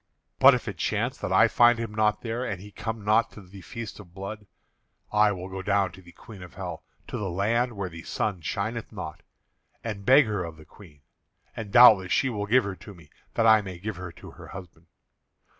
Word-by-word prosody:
But - - +8
if - - -5
it - - -5
chance - - -1
that - - -4
I - - +6
find 120 0 +5
him 115 -2 -5
not 105 0 +1
there, 120 +1 -3
and 100 -7 -4
he 105 +2 -12
come 110 0 -5
not 110 +2 +3
to 105 - -11
the 95 +1 -13
feast 115 +6 -8
of 90 -4 -14
blood, 100 +2 -7 0.7
I 105 0 +4
will 90 -2 -5
go 95 0 -6
down 100 -1 +1
to 95 - -14
the 85 -1 -16
Queen 100 +2 -13
of 90 -1 -12
Hell, - - -6 0.2
to - - -5
the 100 -2 -3
land 115 +7 0
where 100 -3 -4
the 85 -2 -9
sun 95 +1 -3
shineth 110 +9 -3
not, - - -7 0.6
and 105 -3 -5
beg 135 +6 +6
her 105 -4 -2
of 85 -2 -8
the 80 - -15
Queen; 80 -9 -17 0.5
and 105 -3 -6
doubtless 105 -7 +7
she 135 - +2
will 105 -3 -3
give 125 +4 +4
her 100 -1 -4
to 90 +4 -12
me, 80 -4 -18 0.2
that 115 - +2
I 110 -1 +7
may 95 -3 -8
give 100 +1 -5
her 90 -1 -7
to - - -12
her - - -13
husband. 90 -3 -11
100 Hz, 225 wpm, -26 LUFS, 90-110 Hz, 0.7 s, But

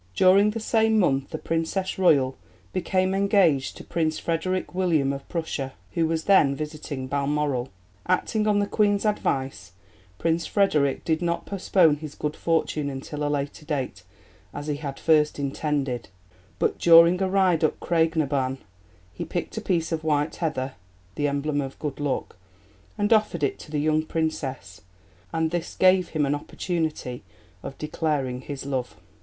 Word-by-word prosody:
During 195 +3 +5
the 220 +2 -3
same 220 0 +2
month 140 -8 +2
the - - -4
Princess 165 +4 -2
Royal 140 -8 +4 0.4
became 185 +1 +1
engaged 195 -8 +2
to - - -9
Prince 160 -2 -1
Frederick 180 +3 -2
William 165 -7 +1
of 140 - -8
Prussia, 145 -5 -3 0.2
who 165 -2 +1
was 160 0 -1
then 150 -9 +4
visiting 150 -2 -5
Balmoral. 140 -1 -1 0.4
Acting 210 +4 +1
on 210 -1 +3
the 205 - +2
Queen's 205 0 +1
advice, 130 - -1 0.4
Prince 165 - 0
Frederick 150 -9 +1
did 160 0 +1
not 170 -1 -1
postpone 180 -5 +3
his 150 -1 -8
good 150 0 -3
fortune 160 -3 0
until 140 +2 -5
a 145 - 0
later 145 +1 -3
date, 135 - -3 0.5
as 145 - -5
he 150 -1 -2
had 145 -2 -5
at - - -14
first 150 -2 +3
intended, 140 -2 -2 0.5
but - - 0
during 170 +2 +7
a 190 - +1
ride 185 -4 +3
up 155 - +1
Craig 165 -1 +1
na 155 -2 +2
Ban, 135 -1 -1 0.6
he - - -5
picked - - -4
a - - -1
piece 170 -3 0
of 160 -1 -2
white 150 -1 0
heather 135 -6 -2 0.4
(the 145 +8 0
emblem 145 +1 -1
of 135 -1 -6
'good 150 -2 -5
luck') 145 -9 -2 0.6
and 205 +1 +3
offered 210 -7 +1
it 140 - 0
to - - -11
the 150 - -2
young 155 +1 +2
Princess, 155 - -3 0.5
and 160 -1 0
this 175 0 -3
gave 185 -1 +4
him 155 -2 0
an 140 - +1
opportunity 155 -4 -3 0.4
of 135 - -8
declaring 150 -5 -2
his 140 0 -7
love. 130 -3 -3
155 Hz, 165 wpm, -25 LUFS, 140-175 Hz, 0.6 s, during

